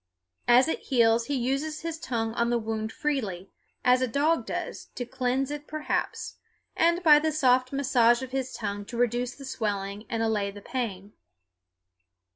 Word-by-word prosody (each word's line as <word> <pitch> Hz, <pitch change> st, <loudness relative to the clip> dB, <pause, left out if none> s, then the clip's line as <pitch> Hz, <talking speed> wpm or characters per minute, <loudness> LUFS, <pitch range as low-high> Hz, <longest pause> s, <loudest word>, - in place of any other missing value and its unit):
As 250 Hz, +3 st, +6 dB
it 320 Hz, -, -1 dB
heals 230 Hz, -3 st, +3 dB
he 285 Hz, -, -1 dB
uses 275 Hz, +5 st, -1 dB
his 330 Hz, -1 st, -4 dB
tongue 230 Hz, -8 st, -2 dB
on 235 Hz, 0 st, +1 dB
the 240 Hz, -, +2 dB
wound 220 Hz, -1 st, -3 dB
freely, 215 Hz, -, -3 dB, 0.3 s
as 250 Hz, +1 st, +5 dB
a 255 Hz, -, +2 dB
dog 295 Hz, +7 st, +1 dB
does, -, -, -4 dB
to 245 Hz, -, -3 dB
cleanse 260 Hz, +2 st, -1 dB
it 295 Hz, 0 st, -6 dB
perhaps, 310 Hz, 0 st, -3 dB, 0.4 s
and 340 Hz, +2 st, +2 dB
by 300 Hz, -3 st, +8 dB
the 315 Hz, +1 st, 0 dB
soft 255 Hz, -4 st, +3 dB
massage 250 Hz, -3 st, +3 dB
of 260 Hz, -, -7 dB
his 265 Hz, -1 st, -2 dB
tongue 205 Hz, -1 st, -4 dB
to 235 Hz, -, -7 dB
reduce 245 Hz, +1 st, 0 dB
the 275 Hz, -, -10 dB
swelling 205 Hz, -4 st, -3 dB
and 225 Hz, 0 st, -1 dB
allay 210 Hz, -3 st, 0 dB
the 200 Hz, +1 st, -9 dB
pain. 205 Hz, -4 st, -4 dB
250 Hz, 170 wpm, -27 LUFS, 225-280 Hz, 0.4 s, by